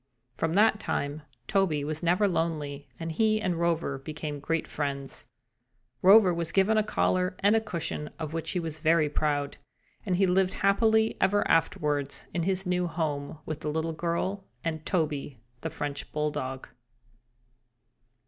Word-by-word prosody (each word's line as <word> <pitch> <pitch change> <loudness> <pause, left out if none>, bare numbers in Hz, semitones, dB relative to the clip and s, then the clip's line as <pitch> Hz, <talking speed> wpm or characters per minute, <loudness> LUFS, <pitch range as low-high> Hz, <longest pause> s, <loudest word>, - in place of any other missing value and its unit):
From 165 0 -1
that 215 +2 +4
time 145 -6 -2 0.2
Toby 185 -7 +1
was 155 +1 -2
never 180 +4 +3
lonely 150 -5 -2
and 165 0 -3
he 215 +5 +2
and 180 -5 -1
Rover 165 -5 0
became 150 0 -5
great 165 +3 -1
friends. 140 -4 -4 0.7
Rover 195 -1 +7
was 170 -1 -1
given 200 +3 +3
a 215 - +4
collar 185 -3 +1
and 205 +2 +5
a 225 - +3
cushion, 165 -7 -4
of 160 -2 -5
which 165 -1 -3
he 180 - 0
was 160 -2 -5
very 155 -1 +3
proud, 145 -2 -1 0.5
and 185 -3 0
he 195 +2 +3
lived 185 +1 +2
happily 220 +2 +3
ever 200 +2 +3
afterwards 150 -3 0
in 175 - 0
his 190 +2 0
new 180 0 +1
home 155 -2 -3
with 155 -1 -4
the 155 - -3
little 160 +2 -1
girl 175 +4 -2 0.2
and 160 -2 -3
Toby, 150 - -1 0.2
the - - -3
French 145 -1 -5
bulldog. 135 -3 -3
165 Hz, 155 wpm, -28 LUFS, 150-190 Hz, 0.7 s, Rover